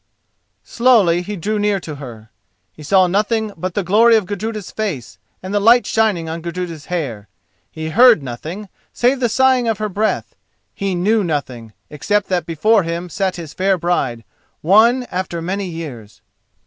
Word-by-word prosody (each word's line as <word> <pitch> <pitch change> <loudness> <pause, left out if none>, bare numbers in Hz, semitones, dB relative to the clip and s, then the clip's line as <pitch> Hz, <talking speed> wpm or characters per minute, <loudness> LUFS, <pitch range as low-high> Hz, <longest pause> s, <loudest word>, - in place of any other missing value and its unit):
_" - - -32
Slowly 220 -9 +3
he 205 +4 -6
drew 210 +4 -2
near 205 -1 +1
to 155 -4 -7
her. 115 -5 -11 0.4
He - - -15
saw 185 +5 +3
nothing 215 +4 0
but 180 +2 -5
the 205 - 0
glory 225 +6 +5
of 215 -3 +2
Gudruda's 210 +1 -5
face 165 - -5 0.2
and 190 +2 -5
the 205 - +2
light 235 +4 +5
shining 210 -7 0
on 165 +1 -5
Gudruda's 170 -2 -6
hair; 130 - -4 0.4
he 160 0 -6
heard 235 - +6
nothing 160 - -7 0.2
save 250 +2 +1
the 240 -2 +1
sighing 260 +1 +3
of 225 -2 0
her 215 0 -3
breath; 215 +3 -2 0.4
he 195 -2 -2
knew 210 +5 +1
nothing 130 - -4 0.2
except 205 +7 -1
that 180 -3 -1
before 205 +7 +3
him 170 +1 -4
sat 190 +2 -2
his 165 -4 -8
fair 190 0 +1
bride, 135 -9 -1 0.4
won 225 +9 +4
after 180 -2 -3
many 190 +4 -3
years. 145 - -9
185 Hz, 170 wpm, -18 LUFS, 160-215 Hz, 0.4 s, heard